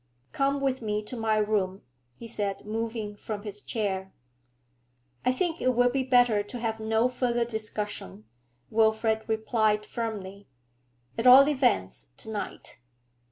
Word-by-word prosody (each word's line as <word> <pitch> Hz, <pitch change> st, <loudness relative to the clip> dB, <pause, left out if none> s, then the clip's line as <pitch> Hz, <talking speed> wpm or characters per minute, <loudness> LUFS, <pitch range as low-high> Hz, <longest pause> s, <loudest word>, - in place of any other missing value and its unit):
'Come 275 Hz, +1 st, 0 dB
with 265 Hz, -2 st, 0 dB
me 210 Hz, -1 st, -2 dB
to 210 Hz, -, -8 dB
my 220 Hz, -2 st, +1 dB
room,' 205 Hz, -3 st, 0 dB, 0.3 s
he 230 Hz, -, -10 dB
said 205 Hz, -3 st, -3 dB
moving 220 Hz, -1 st, -3 dB
from 205 Hz, 0 st, -6 dB
his 205 Hz, -1 st, -2 dB
chair. 190 Hz, -4 st, -3 dB, 1.1 s
'I 250 Hz, -, +3 dB
think 340 Hz, +3 st, -1 dB
it 255 Hz, -1 st, +2 dB
will 245 Hz, +1 st, +4 dB
be 270 Hz, +1 st, 0 dB
better 245 Hz, -4 st, +4 dB
to 205 Hz, +4 st, -8 dB
have 225 Hz, -2 st, -2 dB
no 220 Hz, +2 st, +2 dB
further 245 Hz, -1 st, 0 dB
discussion, 210 Hz, -, -5 dB, 0.5 s
Wilfrid 220 Hz, 0 st, +2 dB
replied 220 Hz, -1 st, +1 dB
firmly, 205 Hz, -4 st, -5 dB, 0.7 s
'at 235 Hz, -, +2 dB
all 265 Hz, +3 st, +10 dB
events 95 Hz, -, +1 dB
to 220 Hz, -, -7 dB
night.' 205 Hz, -9 st, -6 dB
220 Hz, 140 wpm, -27 LUFS, 210-245 Hz, 1.1 s, all